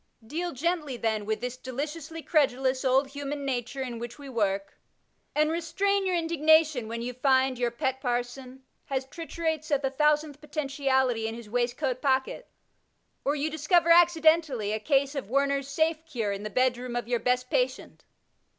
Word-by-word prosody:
Deal 340 +8 -3
gently 305 -2 -2
then 220 -3 -1
with 220 0 -1
this 250 +1 -4
de 255 0 -8
liciously 310 +4 -5
credulous 265 -4 +2
old 265 +1 +3
human 285 0 -5
nature 255 0 -2
in 240 -3 -5
which 240 0 -7
we 285 -1 -10
work, 200 -4 -1 0.6
and 305 +1 +3
restrain 385 +4 0
your 365 - +1
indignation, 315 -6 +3
when 230 +1 -4
you 250 +1 -4
find 260 0 +2
your 240 -1 +1
pet 260 +3 -2
parson 250 +1 -3 0.2
has 265 -1 -2
triturates 320 +1 -4
of 285 -1 +1
the 270 - 0
1000th 300 +1 +1
potentiality 270 -6 0
in 225 - -4
his 235 -2 -10
waistcoat 245 +2 -1
pocket, 265 - 0 0.8
or 285 - +1
you 295 +1 -1
discover 330 +3 +3
accidentally 320 -9 +4
a 215 - -1
case 275 +3 +1
of 275 -8 -5
Warner's 275 +1 +1
Safe 315 +2 0
Cure 230 -9 -2
in 200 0 -4
the 215 - -4
bedroom 250 +1 0
of 240 -1 -2
your 240 -1 +1
best 250 +1 0
patient. - - -1
270 Hz, 170 wpm, -28 LUFS, 245-310 Hz, 0.8 s, accidentally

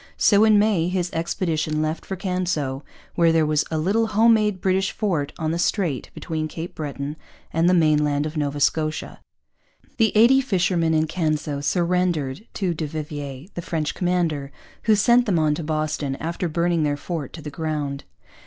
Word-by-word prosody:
So 205 0 +5
in 215 -1 +6
May 205 -5 +2
his 180 -1 -1
expedition 160 -2 -1
left 155 +1 -2
for 190 - -3
Canso, 175 -8 -2 0.3
where 170 -1 +4
there 165 -1 +3
was 150 0 +2
a 160 - -2
little 205 +8 +1
home 225 +2 +5
made 210 -3 +1
British 190 +1 +1
fort 170 -10 -1
on 160 -2 -1
the 170 - -2
strait 175 - 0
between 160 -2 -3
Cape 165 +2 -7
Breton 145 -1 -5 0.4
and 165 +2 +3
the 180 - +4
mainland 150 -3 +2
of 155 +1 -5
Nova 145 -1 -2
Scotia. 155 +2 0 0.8
The 225 -3 +3
eighty 250 +5 +6
fishermen 180 -8 +1
in 155 0 +3
Canso 155 -3 -2
surrendered 175 - 0
to 185 -4 0
du 155 -1 -3
Vivier, 145 -1 -6
the 175 - -5
French 155 -2 -2
commander, 170 -6 -1 0.3
who 215 -1 +5
sent 240 +4 +4
them 190 -4 +2
on 155 -2 +2
to 160 - -4
Boston, 155 -2 -2
after 170 +3 -3
burning 170 +1 +1
their 145 -1 0
fort 155 -3 -5
to 165 - -8
the 150 - -6
ground. 145 -2 -3
165 Hz, 175 wpm, -23 LUFS, 150-185 Hz, 0.8 s, in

